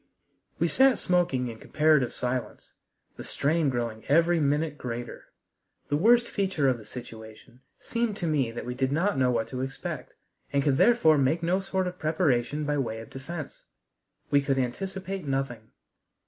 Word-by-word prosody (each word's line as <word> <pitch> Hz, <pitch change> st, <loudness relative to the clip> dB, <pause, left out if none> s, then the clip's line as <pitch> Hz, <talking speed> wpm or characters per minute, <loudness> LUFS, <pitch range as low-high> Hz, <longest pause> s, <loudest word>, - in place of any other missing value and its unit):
We -, -, +2 dB
sat 265 Hz, -3 st, +4 dB
smoking 175 Hz, -9 st, +1 dB
in 115 Hz, -2 st, -7 dB
comparative 150 Hz, -4 st, +2 dB
silence, 125 Hz, 0 st, -4 dB, 0.4 s
the -, -, -7 dB
strain 155 Hz, +1 st, +1 dB
growing 115 Hz, -3 st, -3 dB
every 165 Hz, +3 st, +4 dB
minute 150 Hz, +1 st, +1 dB
greater. 120 Hz, -3 st, -6 dB, 0.6 s
The 145 Hz, -, +1 dB
worst 235 Hz, +9 st, +4 dB
feature 190 Hz, -8 st, 0 dB
of 125 Hz, -2 st, +1 dB
the 110 Hz, -, -13 dB
situation 110 Hz, +1 st, -11 dB, 0.2 s
seemed 230 Hz, -3 st, -2 dB
to 175 Hz, -, -3 dB
me 145 Hz, -7 st, +1 dB
that 115 Hz, -, -6 dB
we 125 Hz, -, -3 dB
did 130 Hz, +1 st, -1 dB
not 185 Hz, +7 st, +1 dB
know 130 Hz, -1 st, +3 dB
what 115 Hz, -2 st, 0 dB
to 130 Hz, -1 st, -4 dB
expect, 135 Hz, +1 st, -5 dB, 0.4 s
and 140 Hz, -1 st, +1 dB
could 135 Hz, -2 st, +2 dB
therefore 160 Hz, -11 st, +5 dB
make 155 Hz, +5 st, +1 dB
no 180 Hz, +3 st, +2 dB
sort 190 Hz, -1 st, -1 dB
of 180 Hz, 0 st, -5 dB
preparation 150 Hz, -3 st, 0 dB
by 145 Hz, 0 st, 0 dB
way 115 Hz, -4 st, -2 dB
of 115 Hz, -, -11 dB
defense. 145 Hz, +3 st, -7 dB, 0.7 s
We 140 Hz, -, +5 dB
could 135 Hz, -1 st, 0 dB
anticipate 190 Hz, +7 st, -3 dB
nothing. 135 Hz, -5 st, -3 dB
145 Hz, 165 wpm, -27 LUFS, 125-175 Hz, 0.7 s, therefore